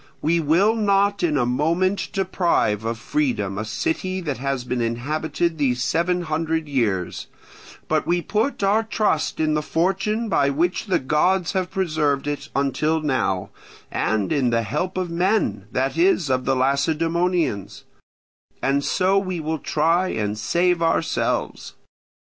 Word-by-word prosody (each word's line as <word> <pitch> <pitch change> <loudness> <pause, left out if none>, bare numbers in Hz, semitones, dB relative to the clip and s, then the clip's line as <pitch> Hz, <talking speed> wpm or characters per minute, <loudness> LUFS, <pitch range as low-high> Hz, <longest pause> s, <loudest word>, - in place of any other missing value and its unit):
We 170 +2 +1
will 170 +8 +3
not 200 -2 +2
in 160 -4 +1
a 125 - +2
moment 165 +10 0
deprive 175 - 0
of 115 0 -2
freedom 230 - -1
a - - -2
city 185 - -2
that 145 -8 -3
has 135 -1 -2
been 125 0 -2
inhabited 155 +8 -1
these 125 -3 +1
seven 170 +5 0
hundred 160 0 -1
years; 110 -10 -1 0.6
but - - 0
we 175 +1 +2
put 220 +2 -1
our 205 +3 +3
trust 215 -7 -1
in 155 -1 +1
the 150 - +1
fortune 195 +8 0
by 140 -9 +2
which 170 +9 0
the 190 - +2
gods 165 +6 +1
have 185 -1 -1
preserved 155 -7 0
it 145 0 -4
until 150 +3 +1
now, 130 -11 -1 0.4
and 110 +3 0
in 135 -5 +2
the 115 -1 +1
help 150 - -3
of 180 -2 -2
men, 175 - 0
that 135 +3 -1
is, 170 -4 +2
of 130 0 0
the 135 - +2
Lacedaemonians; 160 - 0 0.8
and 140 +1 +1
so 190 +4 +2
we 185 -3 -3
will 160 0 -2
try 165 +6 +1
and 105 - -2
save 170 +11 +1
ourselves. 165 0 -1
160 Hz, 150 wpm, -22 LUFS, 135-185 Hz, 0.8 s, will